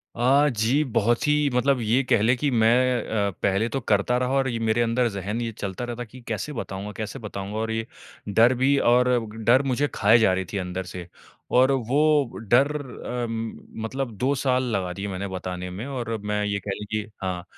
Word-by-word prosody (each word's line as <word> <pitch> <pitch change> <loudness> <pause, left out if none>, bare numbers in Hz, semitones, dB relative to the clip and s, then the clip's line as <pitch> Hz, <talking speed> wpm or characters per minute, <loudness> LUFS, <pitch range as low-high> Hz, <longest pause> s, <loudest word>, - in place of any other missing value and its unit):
अ, 135 +5 +4
जी, 120 +5 +1
बहुत 120 -1 +1
ही 150 -1 +3
मतलब 125 +1 +2
ये 115 +4 +2
कह 115 -4 +2
लें 120 +4 +4
कि 145 +1 0
मैं 120 +2 +3 0.3
अ, - - 0
पहले 100 +4 +2
तो - - +1
करता 110 +1 +1
रहा 125 +1 -1
और 135 - +1
ये 115 - -2
मेरे 115 +2 +2
अंदर 120 +1 +2
ज़हन 100 +3 -4
ये 115 -1 -2
चलता 100 +3 -4
रहता 120 0 -5
कि, 120 +2 -13
"कैसे 150 - -3
बताऊँगा, 100 -4 -5
कैसे 110 +4 -5
बताऊँगा?" 105 -2 -6
और 110 0 -2
ये 110 0 -2 0.4
डर 115 +5 +5
भी 140 +1 +4
और 125 +1 +4 0.3
डर 125 +4 +5
मुझे 145 +4 +1
खाए 110 +3 +5
जा 105 -4 +4
रही 95 0 -1
थी 100 - -2
अंदर 90 0 -3
से। 90 -2 -7 0.4
और 130 +2 +5
वो 140 +2 +2
डर 135 +4 +5
अ, 125 -2 -5 0.6
मतलब 130 +2 -3
2 130 +3 +1
साल 130 -1 +1
लगा 90 -2 -2
दिए 95 +2 -5
मैंने 100 0 -4
बताने 90 -1 -5
में 95 +6 -6
और 120 -5 -3
मैं, 105 0 -2
ये 100 -1 -1
कह 100 0 -5
लें 105 - -6
कि 110 0 0 0.2
हाँ, 90 -2 -3
115 Hz, 205 wpm, -24 LUFS, 100-130 Hz, 0.6 s, डर